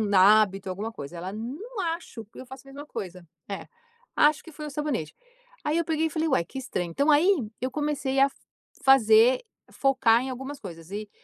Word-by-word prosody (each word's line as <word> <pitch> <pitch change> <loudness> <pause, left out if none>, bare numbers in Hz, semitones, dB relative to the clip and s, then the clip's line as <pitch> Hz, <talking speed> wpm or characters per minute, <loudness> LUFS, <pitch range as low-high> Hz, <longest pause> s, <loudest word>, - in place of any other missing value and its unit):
hábito, 195 0 +5
alguma 205 +5 -4
coisa." 165 -4 -9
E - - -7
ela: 185 +3 -5
"Não 310 - -6 0.2
acho 255 -9 -10
que 210 - -15
eu 255 - -8
faço 265 +1 -12
a - - -12
mesma 285 +2 -9
coisa." 180 -6 -7 0.2
É. 195 - -5 0.5
"Acho 300 0 +4
que 330 - -12
foi 300 0 -8
o - - -7
sabonete." 285 - -3 0.5
Aí 305 +2 0
eu 335 - +1
peguei 320 0 0
e - - -5
falei: 320 +1 -1
"Ué, 215 -10 +2
que 265 - -7
estranho." 180 -9 -3
Então 285 - +1
aí, 310 +6 +5 0.3
eu 255 0 -2
comecei 290 -2 -1
a 275 0 +5 0.5
fazer 245 -2 +6 0.3
focar 255 -4 +3
em 265 - -4
algumas 265 +3 -6
coisas. 170 -4 -10
E 210 0 -5
260 Hz, 205 wpm, -26 LUFS, 205-295 Hz, 0.5 s, fazer